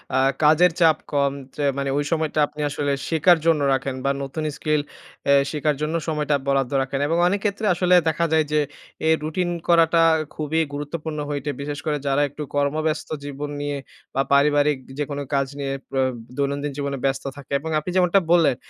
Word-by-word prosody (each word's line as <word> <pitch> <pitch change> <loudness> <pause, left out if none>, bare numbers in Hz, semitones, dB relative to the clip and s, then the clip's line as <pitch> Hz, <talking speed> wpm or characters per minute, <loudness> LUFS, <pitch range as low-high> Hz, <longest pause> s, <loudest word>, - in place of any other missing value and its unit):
আ - - +4 0.2
কাজের 160 +4 +6
চাপ 160 -2 +5
কম 140 -1 +2 0.2
যে 145 - -3
মানে 140 0 -1
ওই 145 - +1
সময়টা 155 -1 0
আপনি 150 - -8
আসলে 145 0 -1 0.2
শেখার 165 +2 +4
জন্য 160 -3 +3
রাখেন 135 0 -2
বা 140 - +3
নতুন 140 +3 -4
skill 155 -1 +1 0.4
অ্যা 140 - +4 0.2
শেখার 150 -1 0
জন্য 155 +2 -1
সময়টা 150 -2 0
বরাদ্দ 135 -2 +1
রাখেন 135 +1 -2
এবং 165 +2 +1
অনেক 200 +2 +1
ক্ষেত্রে 205 +2 -1
আসলে 180 +1 +3
দেখা 170 +2 0
যায় 155 -1 +3
যে 150 - +3 0.5
এ - - +4
রুটিন 175 +3 -1 0.2
করাটা 165 -1 +5 0.3
খুবই 155 +1 -1
গুরুত্বপূর্ণ 150 +1 -4
হইতে 145 0 -2
বিশেষ 145 0 -4
করে 150 -1 0
যারা 140 +1 +2
একটু 150 +2 -7
কর্মব্যস্ত 155 +2 0
জীবন 145 +1 -5
নিয়ে 145 -1 -2 0.4
বা 135 - +3
পারিবারিক 145 0 +4 0.2
যেকোনো 145 -1 -3
কাজ 140 -1 +2
নিয়ে 135 -1 -2 0.2
পে 135 - -2 0.4
দৈনন্দিন 140 +1 -1
জীবনে 140 -1 -2
ব্যস্ত 135 0 0
থাকে 140 -1 -12
এবং 160 - -6
আপনি 155 - -6
যেমনটা 185 +1 +4
বললেন, 165 -7 +5
150 Hz, 180 wpm, -23 LUFS, 140-160 Hz, 0.5 s, কাজের